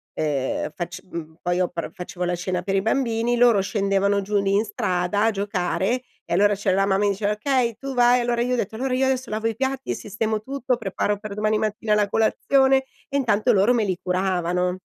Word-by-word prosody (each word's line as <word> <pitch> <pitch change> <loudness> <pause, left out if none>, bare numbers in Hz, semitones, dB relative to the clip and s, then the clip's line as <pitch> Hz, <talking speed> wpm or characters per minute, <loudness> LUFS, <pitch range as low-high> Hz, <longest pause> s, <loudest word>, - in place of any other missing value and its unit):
uhm, 145 -3 -1
fac 175 0 -5
mhmm, 165 -3 -8
poi 175 0 0
io 180 -1 +1
pr 170 -3 -5
facevo 180 0 -5
la 175 0 0
cena 180 +1 -2
per 195 +1 -1
i 195 - +2
bambini, 235 +1 0
loro 235 -4 +5
scendevano 200 0 +1
giù 205 +1 -1
lì 195 0 0
in 205 +3 +2
strada 195 -1 -1
a 225 - +3
giocare 200 +3 -1 0.2
e - - -3
allora 205 +3 +4
c'era 195 -1 0
la 195 - +3
mamma 195 +1 +2
mi - - +3
diceva: 200 +1 -1
"Okay 235 +1 0
tu 270 +2 -6
vai!" 245 0 +5
Allora 240 0 0
io 250 +1 0
ho - - +1
detto: 220 -1 -3
"Allora 255 +3 -2
io 265 +1 +2
adesso 260 0 -1
lavo 220 +1 -1
i 225 - -2
piatti 265 +2 -2
e - - -1
sistemo 215 +1 -2
tutto, 265 +1 -1
preparo 205 -1 -1
per 210 -1 -7
domani 215 +1 +1
mattina 215 0 -1
la 205 -1 +1
colazione." 265 +5 +3 0.3
E 280 - -5
intanto 220 -6 +2
loro 200 +5 +4
me 230 -3 +1
li 185 -3 -1
curavano. 180 -1 0
210 Hz, 220 wpm, -23 LUFS, 190-235 Hz, 0.3 s, loro